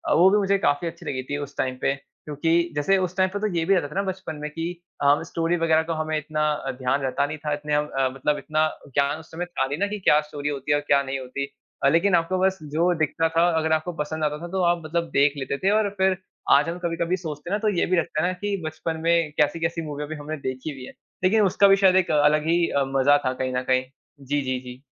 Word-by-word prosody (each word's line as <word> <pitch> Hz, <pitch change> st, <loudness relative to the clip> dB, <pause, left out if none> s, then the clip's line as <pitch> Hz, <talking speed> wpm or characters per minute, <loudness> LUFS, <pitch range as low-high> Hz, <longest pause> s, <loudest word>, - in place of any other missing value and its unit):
वो 180 Hz, +3 st, +7 dB
भी 210 Hz, -, +4 dB
मुझे 200 Hz, -1 st, +2 dB
काफ़ी 155 Hz, -3 st, +1 dB
अच्छी 165 Hz, -, -8 dB
लगी 130 Hz, -4 st, -3 dB
थी 145 Hz, -, -1 dB
उस 145 Hz, -1 st, -7 dB
टाइम 130 Hz, -1 st, -1 dB
पे। 140 Hz, -, +2 dB
क्योंकि 150 Hz, +3 st, -5 dB, 0.2 s
जैसे 170 Hz, +7 st, +2 dB
उस 185 Hz, -1 st, -2 dB
टाइम 185 Hz, 0 st, +3 dB
पे 205 Hz, -, -2 dB
तो 215 Hz, -, 0 dB
ये 165 Hz, -, +1 dB
भी 195 Hz, -, +3 dB
रहता 165 Hz, -6 st, 0 dB
था 150 Hz, -, -12 dB
ना 195 Hz, -, +2 dB
बचपन 190 Hz, -4 st, -6 dB
में 150 Hz, -, -4 dB
कि 165 Hz, +2 st, -3 dB, 0.3 s
अ, 145 Hz, +1 st, +4 dB
स्टोरी 165 Hz, +1 st, -1 dB
वग़ैरह 160 Hz, -1 st, +3 dB
का 165 Hz, +1 st, -3 dB
हमें 155 Hz, 0 st, -1 dB
इतना 155 Hz, 0 st, -2 dB, 0.4 s
ध्यान 135 Hz, +2 st, +1 dB
रहता 135 Hz, +1 st, 0 dB
नहीं 155 Hz, +2 st, -5 dB
था 150 Hz, -, 0 dB
इतने 150 Hz, 0 st, -3 dB
अब 150 Hz, 0 st, 0 dB
अ, 130 Hz, -1 st, +2 dB
मतलब 150 Hz, +2 st, 0 dB
इतना 155 Hz, +1 st, +1 dB, 0.3 s
ज्ञान 140 Hz, +2 st, +1 dB
उस 160 Hz, -, -15 dB
समय 175 Hz, +2 st, -4 dB
था 170 Hz, -6 st, -1 dB
नहीं 140 Hz, -, -3 dB
ना, 200 Hz, -, +1 dB
कि 210 Hz, +1 st, -5 dB
क्या 150 Hz, -5 st, +4 dB
स्टोरी 145 Hz, -1 st, -5 dB
होती 140 Hz, 0 st, -3 dB
है? 145 Hz, -, +4 dB
और 145 Hz, -, -2 dB
क्या 140 Hz, 0 st, +4 dB
नहीं 135 Hz, 0 st, -3 dB
होती? 130 Hz, +2 st, -4 dB, 0.4 s
लेकिन 175 Hz, +3 st, +3 dB
आपको 170 Hz, +3 st, +1 dB
बस 190 Hz, 0 st, +2 dB, 0.2 s
जो 175 Hz, +3 st, +3 dB
दिखता 160 Hz, +1 st, +1 dB
था 165 Hz, +1 st, +1 dB, 0.2 s
अगर 160 Hz, 0 st, 0 dB
आपको 160 Hz, +3 st, 0 dB
पसंद 155 Hz, +1 st, -3 dB
आता 150 Hz, 0 st, 0 dB
था 175 Hz, -, -5 dB
तो 190 Hz, -, 0 dB
आप 170 Hz, -1 st, +2 dB
मतलब 170 Hz, +1 st, -2 dB
देख 140 Hz, +1 st, +4 dB
लेते 135 Hz, 0 st, -3 dB
थे 190 Hz, -, +1 dB
और 215 Hz, -1 st, +2 dB
फ़िर 190 Hz, -1 st, +2 dB, 0.3 s
आज 145 Hz, +3 st, +5 dB
हम 170 Hz, -, -4 dB
कभी-कभी 170 Hz, +1 st, 0 dB
सोचते 155 Hz, -2 st, -7 dB
हैं -, -, -2 dB
ना 210 Hz, -, -1 dB
तो -, -, +5 dB
ये -, -, +3 dB
भी 185 Hz, -, +1 dB
लगता 155 Hz, -2 st, 0 dB
है -, -, +2 dB
ना 185 Hz, -, -1 dB
कि 205 Hz, 0 st, -1 dB
बचपन 160 Hz, +1 st, -4 dB
में 165 Hz, -2 st, +2 dB
कैसी-कैसी 165 Hz, +2 st, +1 dB
मूवी 150 Hz, +1 st, -5 dB
हमने 150 Hz, +1 st, -6 dB
देखी 130 Hz, +4 st, -4 dB
हुई 130 Hz, -1 st, -9 dB
हैं -, -, -11 dB, 0.3 s
लेकिन 215 Hz, +4 st, +4 dB
उसका 200 Hz, +2 st, +4 dB
भी 195 Hz, -, +7 dB
शायद 185 Hz, -1 st, +6 dB
एक 185 Hz, -2 st, +3 dB
अलग 150 Hz, +1 st, +3 dB
ही 170 Hz, +1 st, +3 dB, 0.4 s
मज़ा 145 Hz, +2 st, +5 dB
था 130 Hz, -, +1 dB
कहीं 130 Hz, 0 st, -3 dB
न 125 Hz, -, +1 dB
कहीं। 130 Hz, 0 st, +2 dB, 0.4 s
जी, 140 Hz, +1 st, -1 dB
जी, 130 Hz, -1 st, -2 dB
जी। 125 Hz, 0 st, -11 dB
155 Hz, 260 wpm, -24 LUFS, 145-175 Hz, 0.4 s, वो